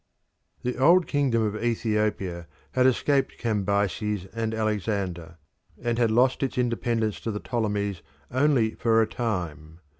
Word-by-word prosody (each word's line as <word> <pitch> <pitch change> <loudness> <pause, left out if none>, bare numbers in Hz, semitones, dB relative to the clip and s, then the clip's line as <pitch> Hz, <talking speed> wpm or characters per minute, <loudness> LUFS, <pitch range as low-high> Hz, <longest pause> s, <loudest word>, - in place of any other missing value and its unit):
The 125 0 -2
old 170 +6 +6
kingdom 135 -6 +1
of 110 +1 -2
Ethiopia 105 -7 -1 0.2
had 130 0 +4
escaped 135 +1 +1
Cambyses 100 -2 -1
and 115 -1 -2
Alexander, 100 -6 -2 0.4
and 120 0 -1
had 115 -2 +3
lost 125 +4 +3
its 135 -2 -2
independence 115 -3 0
to - - -4
the 105 -1 -3
Ptolemies 105 -6 -2 0.3
only 130 -4 +2
for 115 -1 +2
a 110 - +4
time. 85 - -4
110 Hz, 130 wpm, -26 LUFS, 100-120 Hz, 0.4 s, old